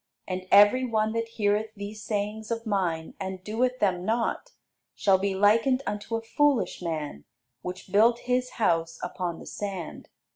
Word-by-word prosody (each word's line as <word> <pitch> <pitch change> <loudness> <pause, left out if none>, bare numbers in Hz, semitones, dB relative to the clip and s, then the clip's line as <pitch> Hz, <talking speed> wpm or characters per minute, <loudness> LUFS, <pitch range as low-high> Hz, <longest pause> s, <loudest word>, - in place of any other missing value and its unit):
And 185 0 -4
every 205 +6 +7
one 220 -3 0
that 230 0 -1
heareth 215 -1 0
these 205 +1 -7
sayings 215 +1 -3
of 230 0 -3
mine, 180 -6 -1
and 190 -1 -5
doeth 245 +5 0
them 185 -6 +1
not, 230 - -1 0.5
shall 195 -3 +3
be 195 0 -1
likened 230 +7 +3
unto 210 +2 -3
a 225 - -3
foolish 280 0 +1
man 155 - -4 0.4
which 185 +3 -7
built 230 +4 +4
his 250 0 -1
house 165 -7 +1
upon 180 -1 -3
the - - -11
sand. 195 -5 -6
205 Hz, 155 wpm, -27 LUFS, 185-230 Hz, 0.5 s, every